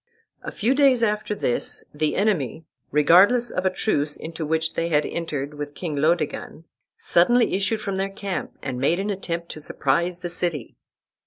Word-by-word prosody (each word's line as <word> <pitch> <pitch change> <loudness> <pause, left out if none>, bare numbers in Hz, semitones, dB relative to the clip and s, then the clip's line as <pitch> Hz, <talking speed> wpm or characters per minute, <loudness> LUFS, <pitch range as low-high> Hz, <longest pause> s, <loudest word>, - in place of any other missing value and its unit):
A - - -6
few 230 +5 +1
days 270 -4 +4
after 210 -1 0
this, 120 - -2
the 150 +1 0
enemy, 165 - 0 0.2
regardless 190 +11 +5
of 185 +1 0
a - - +4
truce 150 -6 -1
into 160 -1 -6
which 160 +1 0
they 165 0 -1
had 150 -2 +2
entered 150 -4 -4
with 145 0 -7
King 165 -5 -4
Laodegan, 155 +1 -1 0.3
suddenly 235 +8 +3
issued 200 +3 +1
from 195 -2 -3
their 195 +1 -1
camp 195 -2 -5
and 130 -2 -4
made 165 +6 +2
an 205 +2 -1
attempt 170 -3 -4
to 155 - -7
surprise 170 +6 0
the 175 - -4
city. 170 -7 -2
170 Hz, 170 wpm, -23 LUFS, 150-200 Hz, 0.3 s, regardless